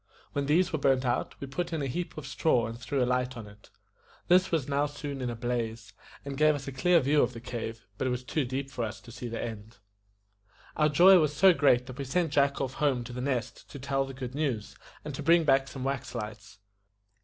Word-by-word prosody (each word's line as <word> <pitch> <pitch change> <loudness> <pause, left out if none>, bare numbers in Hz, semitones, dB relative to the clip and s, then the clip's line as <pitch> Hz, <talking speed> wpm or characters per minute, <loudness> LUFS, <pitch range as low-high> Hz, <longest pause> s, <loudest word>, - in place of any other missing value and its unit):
When 140 -1 -1
these 175 +5 +3
were 155 - 0
burnt 135 -2 +2
out, 120 0 -1
we - - -5
put 170 +6 -4
in 160 -3 -2
a - - -1
heap 170 +7 -4
of 155 - -6
straw 135 -3 +1
and 115 - -5
threw 130 +2 -1
a - - +2
light 125 0 -1
on 115 - -7
it. 105 0 -16 0.6
This 185 +2 +5
was 160 -6 0
now 145 +1 +1
soon 145 -1 -6
in 125 - -2
a 120 - -4
blaze, 115 -3 -3 0.3
and 140 -1 -4
gave 155 0 +5
us 140 -1 -7
a - - -3
clear 170 +7 +3
view 145 +2 +3
of 125 - +1
the 115 - -7
cave; 115 -1 -6
but 130 - 0
it - - +1
was 125 0 -2
too 150 +4 -1
deep 135 +2 -4
for 120 - -3
us 110 -2 -4
to 105 +5 -14
see 120 +1 -6
the 115 0 -5
end. 110 -1 -7 1.0
Our 150 0 +3
joy 180 +5 +7
was 150 -2 +1
so 190 +5 +6
great 125 -6 +3
that 130 +1 -10
we - - -2
sent 165 +3 0
Jack 140 -1 +2
off 130 -2 -2
home 135 -5 +2
to 120 +1 -9
The 125 - -4
Nest 130 -3 -3
to - - -9
tell 135 0 -1
the 135 -1 -9
good 130 -1 -6
news, 135 -8 -2 0.3
and 150 - -5
to 135 - -5
bring 165 +3 +5
back 135 -2 +3
some 130 -2 -7
wax 135 -2 -3
lights. 110 -1 -7
135 Hz, 245 wpm, -29 LUFS, 120-145 Hz, 1.0 s, joy